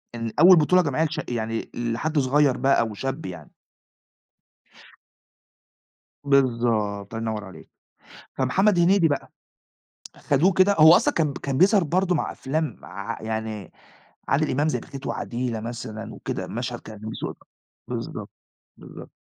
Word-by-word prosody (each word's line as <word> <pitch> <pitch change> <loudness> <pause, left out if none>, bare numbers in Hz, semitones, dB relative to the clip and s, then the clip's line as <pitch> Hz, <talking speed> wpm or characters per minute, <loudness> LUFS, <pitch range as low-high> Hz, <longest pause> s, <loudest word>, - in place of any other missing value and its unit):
إن 115 -1 -4
أول 180 +2 +8
بطولة 180 +4 +4
جماعية 155 0 0
لشا 155 - -3
يعني 115 -1 -3
لحد 120 +7 -1
صغيّر 135 0 +3
بقى 135 0 +3
أو 110 -2 -1
شاب 135 +6 -4
يعني. 85 -4 -9 2.7
بالضبط، 115 -7 +1
الله - - -3
ينوّر 105 -1 -4
عليك، 95 - -13 0.7
فمحمد 180 +10 +2
هنيدي 175 -1 +4
بقى 145 - -3 0.8
خدوه 160 +7 +2
كده 190 +3 +4
هو 160 +2 +9
أصلًا - - +2
كان 150 -4 0
كان 135 -1 -3
بيظهَر 195 +2 +5
برضه 180 +3 +1
مع - - -2
أفلام 145 -2 -3
ع 100 +4 -6
يعني 110 -2 -4 0.6
عادل 150 +2 +1
إمام 145 +4 +1
زي - - -1
بخيت 135 0 -9
وعديلة 120 -1 -3
مثلًا 115 -1 -7
وكده - - -5
مشهد - - -4
كان 110 -1 -11
بيسوق 110 +1 -6 0.5
بالضبط، - - -5 0.5
بالضبط، - - -12
135 Hz, 135 wpm, -24 LUFS, 115-155 Hz, 2.7 s, هو